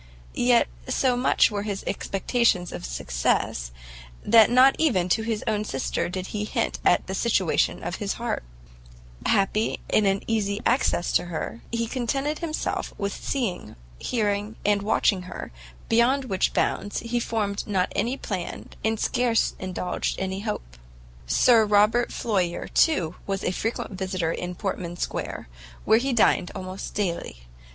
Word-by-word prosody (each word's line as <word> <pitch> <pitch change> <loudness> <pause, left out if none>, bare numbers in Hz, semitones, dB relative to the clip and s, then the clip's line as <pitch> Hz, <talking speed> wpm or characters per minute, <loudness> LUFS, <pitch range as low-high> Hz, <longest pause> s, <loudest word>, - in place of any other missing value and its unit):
Yet - - +4 0.2
so 255 -2 +2
small 250 +2 +1 0.2
were 205 -1 -2
his 205 -2 -4
expectations 195 -3 0
of - - -6
success, - - -1 0.5
that 225 0 +7
not 255 +3 +6
even 195 - +2
to 220 - +2
his 220 -1 -2 0.2
sister 135 +1 -2
did 185 +1 -4
he 210 +1 -3
hint 210 - -1
at 175 - +3
the 190 - -5
situation 195 -5 +1
of 175 +2 -3
his 200 -2 -2
heart: 235 - -3 0.8
happy 205 +3 +1
in 210 -2 +3
an 195 0 +1
easy 205 -2 0
access 235 -8 +2
to - - +2
her, 155 -9 -5
he 230 0 0
contented 270 +5 -2
himself 325 -2 -3
with 200 -1 -2
seeing, 210 - -3 0.2
hearing 210 -2 -1
and 205 0 +3
watching 200 -2 +2
her, - - -7 0.4
beyond 250 +4 +3
which 190 -6 +1
bounds 205 - -1
he 240 +1 -1
formed 210 -4 -2
not 190 -3 0
any 250 +4 0
plan, 185 -9 -5
and 220 0 0
scarce 240 -2 +1
indulged 180 -1 -3
any 190 0 -2
hope. 200 - -5 0.5
Sir 230 - +5
Robert 210 +3 +3
Floyer, 185 -6 -1
too, 180 - +2
was 195 -1 -2
a - - +1
frequent 225 +5 -3
visitor 185 -3 -2
in 180 +1 -4
Portman 175 -3 -4
Square, - - -4 0.4
where 220 +1 +5
he 270 +3 -1
dined 210 -6 +3
almost 185 +1 -6
daily. 170 - -2
205 Hz, 145 wpm, -25 LUFS, 185-230 Hz, 0.8 s, that